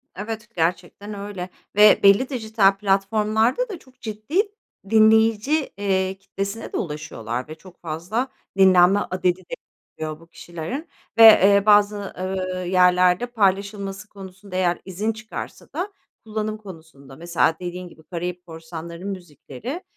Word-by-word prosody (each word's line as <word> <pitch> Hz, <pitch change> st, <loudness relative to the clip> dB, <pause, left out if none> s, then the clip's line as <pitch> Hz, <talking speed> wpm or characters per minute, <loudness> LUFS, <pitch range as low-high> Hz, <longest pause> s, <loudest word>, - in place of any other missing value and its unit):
Evet, 220 Hz, +3 st, -6 dB
gerçekten 180 Hz, +5 st, -2 dB
öyle 200 Hz, -3 st, -6 dB, 0.3 s
ve 210 Hz, 0 st, +7 dB
belli 200 Hz, +7 st, +5 dB
dijital 220 Hz, -6 st, +2 dB
platformlarda 215 Hz, -, +1 dB
da 370 Hz, -6 st, -6 dB
çok 260 Hz, -1 st, -23 dB
ciddi 220 Hz, -, -1 dB, 0.5 s
dinleyici, 220 Hz, +6 st, +4 dB
eee, 190 Hz, -1 st, 0 dB
kitlesine 200 Hz, +3 st, -6 dB
de -, -, -1 dB
ulaşıyorlar 150 Hz, -6 st, -5 dB
ve 155 Hz, -, -8 dB
çok 180 Hz, +2 st, -17 dB
fazla 175 Hz, +10 st, -3 dB, 0.3 s
dinlenme 190 Hz, +1 st, +6 dB
adedi 185 Hz, -1 st, -1 dB
de 180 Hz, -, -11 dB, 0.5 s
oluyor 155 Hz, -1 st, -4 dB
bu 165 Hz, -, -18 dB
kişilerin 175 Hz, -, -7 dB, 0.3 s
ve, 225 Hz, -1 st, +9 dB
ııı, 200 Hz, +1 st, +2 dB
bazı, 205 Hz, -1 st, +3 dB
ııı, 185 Hz, -1 st, -3 dB
yerlerde 180 Hz, +2 st, +4 dB
paylaşılması 200 Hz, -2 st, -1 dB
konusunda, 190 Hz, -1 st, -11 dB
eğer 175 Hz, -2 st, +1 dB
izin 205 Hz, +4 st, -2 dB
çıkarsa 220 Hz, 0 st, -8 dB
da 390 Hz, +3 st, -3 dB, 0.3 s
kullanım 215 Hz, 0 st, -3 dB
konusunda 160 Hz, -9 st, -13 dB
mesela 170 Hz, -1 st, +1 dB
dediğin 180 Hz, 0 st, -6 dB
gibi 160 Hz, -, -17 dB
Karayip 180 Hz, +1 st, -5 dB
Korsanları'nın 165 Hz, +2 st, -8 dB
müzikleri, 180 Hz, -, -7 dB
195 Hz, 130 wpm, -22 LUFS, 175-215 Hz, 0.5 s, ve